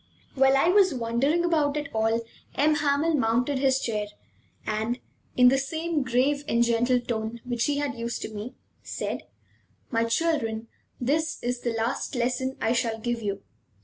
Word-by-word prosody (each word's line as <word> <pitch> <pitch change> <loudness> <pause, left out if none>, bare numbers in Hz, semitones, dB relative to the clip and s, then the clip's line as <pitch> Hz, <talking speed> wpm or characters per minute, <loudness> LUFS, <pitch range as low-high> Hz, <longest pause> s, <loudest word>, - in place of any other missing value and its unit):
While 270 0 +4
I 330 - +4
was 380 -5 +5
wondering 255 +8 +1
about 300 -4 +2
it 295 -1 -2
all, 225 +1 +1 0.3
M. 300 +2 +4
Hamel 295 +2 +2
mounted 250 +1 +1
his 265 -1 +3
chair, 215 -5 -2 0.6
and, 220 +3 -1 0.4
in 250 0 +8
the 270 +1 +3
same 320 +3 -1
grave 260 +3 +1
and 235 +1 +3
gentle 240 +2 +2
tone 235 -1 -3
which 240 -2 0
he 290 -1 0
had 285 -1 -1
used 235 -1 -4
to 220 - -6
me, 215 +4 -6 0.3
said: - - -4 0.6
"My 230 -1 +2
children, 230 -5 0 0.3
this 305 +5 0
is 245 0 -1
the 235 - -1
last 230 +4 -2
lesson 255 +2 -1
I 225 - +1
shall 230 -2 0
give 235 +1 -2
you. 200 -2 -3
250 Hz, 165 wpm, -26 LUFS, 230-285 Hz, 0.6 s, in